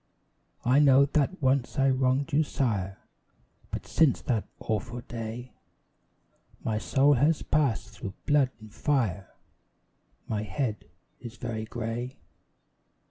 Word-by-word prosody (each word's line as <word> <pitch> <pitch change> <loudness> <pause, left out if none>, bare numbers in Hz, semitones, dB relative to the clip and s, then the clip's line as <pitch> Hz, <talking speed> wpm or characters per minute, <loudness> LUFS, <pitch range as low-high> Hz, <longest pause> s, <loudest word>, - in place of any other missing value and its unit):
I 130 +4 +5
know 140 -1 +6
that 150 +4 0
once 130 +1 +1
I 135 0 +4
wronged 130 +3 +1
your 155 +2 +4
sire, 100 -10 -1 0.7
But - - -5
since 160 -5 +3
that 115 -4 -1
awful 120 +2 -3
day 120 +1 -6 1.1
My 110 -1 0
soul 135 +10 +4
has 145 +5 +2
passed 145 -7 +1
through 95 -1 -7
blood 145 -3 +4
and 110 -1 -13
fire, 110 - 0 1.0
My 105 -2 -1
head 110 0 -3 0.3
is 120 0 -9
very 115 -3 -4
grey. 120 +3 -4
125 Hz, 120 wpm, -28 LUFS, 110-140 Hz, 1.1 s, know